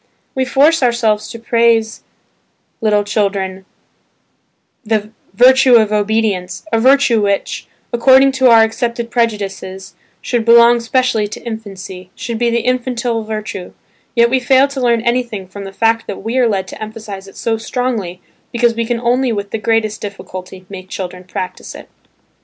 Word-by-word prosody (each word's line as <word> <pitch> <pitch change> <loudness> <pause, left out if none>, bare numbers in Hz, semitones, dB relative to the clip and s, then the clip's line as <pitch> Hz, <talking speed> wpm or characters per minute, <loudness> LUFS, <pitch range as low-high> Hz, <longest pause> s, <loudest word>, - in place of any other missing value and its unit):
We 260 0 0
force 290 +5 +3
ourselves 230 -4 +1
to - - -7
praise 230 -1 +1
to - - -36 0.8
little 210 -2 +2
children 195 -2 -2 1.2
"the 215 -1 -1 0.2
virtue 255 +2 +6
of 215 -2 +4
obedience" 210 - -1
a 225 - +3
virtue 260 -2 +4
which, 200 -1 -2 0.3
according 265 +3 +5
to 260 -1 +3
our 225 -1 +7
accepted 235 +1 -2
prejudices, 195 -4 -3 0.3
should 240 -2 -1
belong 235 +1 +6
specially 230 -2 0
to 205 - -9
infancy, 195 -5 -8
should 235 -2 -5
be 240 0 +2
the 235 0 0
"infantile 245 -1 -1
virtue" 215 -4 -6 0.4
yet 235 0 +4
we 260 - +3
fail 260 +2 +4
to 275 -1 -5
learn 235 -2 +2
anything 235 -5 -2
from 200 +2 -9
the 195 - -7
fact 225 +3 0
that 195 - -6
we 225 +3 -3
are 245 -2 +3
led 190 -3 -1
to - - -10
emphasize 215 -3 -8
it 195 - -15
so 225 -1 -1
strongly 225 -7 -3 0.3
because 235 -1 +2
we 230 0 -2
can 240 -1 -1
only 245 +1 +1
with 200 -2 -4
the 225 - -2
greatest 220 -1 0
difficulty 185 -2 -8
make 185 -1 -10
children 180 -1 -6
practise 185 0 -6
it. - - -11
225 Hz, 160 wpm, -16 LUFS, 200-240 Hz, 1.2 s, our